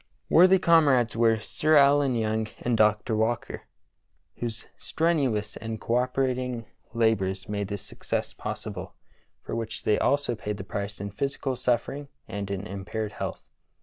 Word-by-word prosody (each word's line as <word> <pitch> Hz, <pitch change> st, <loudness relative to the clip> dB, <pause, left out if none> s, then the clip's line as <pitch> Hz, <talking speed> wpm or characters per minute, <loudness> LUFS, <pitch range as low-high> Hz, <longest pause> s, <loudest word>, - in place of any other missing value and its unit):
Worthy 185 Hz, +3 st, +7 dB
com 165 Hz, -4 st, +5 dB
rades 120 Hz, -4 st, +2 dB
were 115 Hz, -1 st, +4 dB
Sir 155 Hz, +7 st, +1 dB
Allen 140 Hz, -2 st, +5 dB
Young 110 Hz, -1 st, 0 dB
and 120 Hz, -1 st, 0 dB
Dr. 105 Hz, +1 st, +3 dB
Walker, 110 Hz, +1 st, -1 dB, 0.7 s
whose 115 Hz, -2 st, -4 dB
strenuous 135 Hz, -11 st, 0 dB
and 110 Hz, -1 st, -5 dB
co 115 Hz, +3 st, 0 dB
operating 125 Hz, -2 st, -1 dB, 0.3 s
labors 95 Hz, -5 st, +1 dB
made 100 Hz, -1 st, -2 dB
this 100 Hz, -1 st, -5 dB
success -, -, -4 dB
possible, -, -, -6 dB, 0.5 s
for -, -, -4 dB
which 115 Hz, -1 st, -4 dB
they 105 Hz, -, +2 dB
also 140 Hz, -2 st, +2 dB
paid 105 Hz, -2 st, -4 dB
the 95 Hz, -, -6 dB
price 100 Hz, +1 st, -5 dB
in 100 Hz, 0 st, -5 dB
physical 135 Hz, +3 st, -2 dB
suffering 125 Hz, +3 st, -1 dB, 0.2 s
and 100 Hz, -1 st, -5 dB
in 100 Hz, 0 st, -3 dB
impaired 100 Hz, +2 st, -4 dB
health. -, -, -5 dB
115 Hz, 150 wpm, -27 LUFS, 105-130 Hz, 0.7 s, Worthy